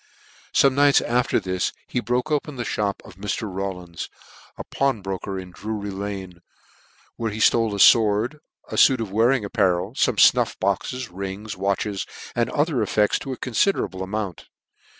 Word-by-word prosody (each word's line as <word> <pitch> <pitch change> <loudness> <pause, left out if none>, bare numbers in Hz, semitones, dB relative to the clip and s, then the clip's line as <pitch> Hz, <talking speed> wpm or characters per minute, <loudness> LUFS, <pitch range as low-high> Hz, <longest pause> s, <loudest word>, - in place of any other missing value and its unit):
Some 135 -1 +4
nights 145 +1 +5
after 120 +1 +1
this 90 -1 -2
he - - -2
broke 125 +6 -1
open 150 -1 -1
the 120 -2 -4
mop 100 -2 -2
of 95 -3 -14
Mr. 105 +1 -3 0.2
Hawlins, 90 -4 -5 0.5
a - - -5
pawnbroker 100 -7 -2
in 90 -1 -7
Drury 105 +1 -5
lanc, 95 -2 -6 0.8
where 115 -1 -1
he 105 - -6
ftole 115 0 +3
a - - -2
fword, 110 +6 +4 0.3
a - - -3
fuit 130 -3 +6
of 110 -4 -4
wearing 115 +3 +2
apparel, 95 +1 +1
fome - - +1
fnuff - - +4
boxes, 115 +6 -1
rings, 100 +3 -6
watches, 100 +1 -2 0.3
and 120 0 +1
other 145 -3 0
ef 105 - -1
fects 105 -1 +3
to 135 - -6
a 130 - -4
confiderable 120 - 0
amount. 95 -2 -4
105 Hz, 160 wpm, -23 LUFS, 95-125 Hz, 0.8 s, fuit